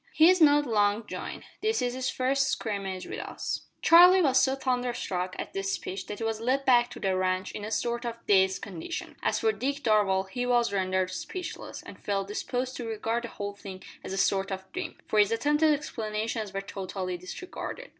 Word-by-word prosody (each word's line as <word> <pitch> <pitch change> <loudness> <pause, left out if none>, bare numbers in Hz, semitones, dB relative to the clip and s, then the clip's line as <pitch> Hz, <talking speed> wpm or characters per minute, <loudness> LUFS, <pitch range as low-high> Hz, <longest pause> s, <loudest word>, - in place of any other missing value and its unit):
"He's 345 +3 +6
not 295 -1 +6
long 210 -2 +2
joined. - - -6 0.2
This 440 +1 +1
is 245 -1 0
his 255 0 -2
first 270 +1 +1
scrimmage 195 -4 -3
with - - -6
us." - - -4 0.2
Charlie 360 +2 +8
was 265 -3 +4
so 265 0 +2
thunderstruck 245 -9 -2
at - - -6
this 195 0 -1
speech 190 +1 -5
that 210 - -5
he 225 - -5
was 225 -1 -1
led 265 +4 +1
back 245 -2 +5
to - - -9
the 190 -1 0
ranch 185 0 0
in 205 - -7
a 210 - -4
sort 235 +2 -1
of 235 -1 -3
dazed 190 -1 +3
condition. 195 - -6
As - - +1
for 445 - +3
Dick 280 -5 -3
Darvall, 205 -4 +3
he 245 +6 -3
was 240 -4 +2
rendered 185 -1 0
speechless, 360 - -6
and - - -11
felt 195 -1 -2
disposed 250 +4 -3
to 240 - -5
regard 225 +2 -2
the - - -7
whole 205 -1 -5
thing 195 -2 -10 0.2
as - - -6
a 195 - -3
sort 195 0 +2
of 190 0 -4
dream, 365 -1 -5
for 215 - +2
his 205 +1 +5
attempted 295 +7 +3
explanations 220 -6 -2
were 195 0 -3
totally 190 -1 -4
disregarded. 365 - -7
225 Hz, 200 wpm, -28 LUFS, 195-260 Hz, 0.2 s, Charlie